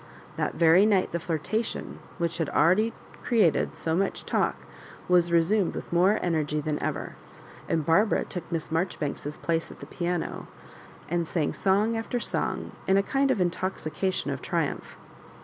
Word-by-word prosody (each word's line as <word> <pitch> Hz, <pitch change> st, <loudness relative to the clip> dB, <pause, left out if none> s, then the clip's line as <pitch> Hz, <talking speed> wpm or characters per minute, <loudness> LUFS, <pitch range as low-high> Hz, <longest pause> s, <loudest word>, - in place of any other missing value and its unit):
That -, -, -2 dB
very 170 Hz, +5 st, +6 dB
night 195 Hz, -4 st, +2 dB
the 170 Hz, -, -1 dB
flirtation, 175 Hz, +7 st, -3 dB, 0.2 s
which 170 Hz, -1 st, -1 dB
had 165 Hz, -, 0 dB
already 185 Hz, +9 st, +3 dB, 0.3 s
created 190 Hz, -8 st, +2 dB
so 160 Hz, 0 st, -1 dB
much 195 Hz, +2 st, -1 dB
talk, -, -, +1 dB, 0.5 s
was 175 Hz, -1 st, +4 dB
resumed 170 Hz, +4 st, +2 dB
with -, -, -6 dB
more 185 Hz, +5 st, +4 dB
energy 155 Hz, -3 st, 0 dB
than 150 Hz, 0 st, -2 dB
ever; -, -, -3 dB, 0.6 s
and 160 Hz, -3 st, 0 dB
Barbara 200 Hz, +7 st, +3 dB
took 175 Hz, -1 st, -7 dB
Miss 165 Hz, -2 st, -3 dB
Mar 165 Hz, +4 st, +2 dB
joribanks^s 145 Hz, -2 st, -5 dB
place 165 Hz, -1 st, 0 dB
at -, -, -12 dB
the -, -, -8 dB
piano, 175 Hz, -1 st, -3 dB, 0.6 s
and 170 Hz, 0 st, -1 dB
sang 155 Hz, -4 st, -1 dB
song 205 Hz, +4 st, +2 dB
after 225 Hz, +2 st, -2 dB
song -, -, -2 dB, 0.2 s
in 190 Hz, -, +4 dB
a 195 Hz, -, +3 dB
kind 275 Hz, +5 st, +1 dB
of 215 Hz, -, +2 dB
intoxication 185 Hz, 0 st, -1 dB
of -, -, -4 dB
triumph. -, -, -2 dB
175 Hz, 160 wpm, -27 LUFS, 165-195 Hz, 0.6 s, very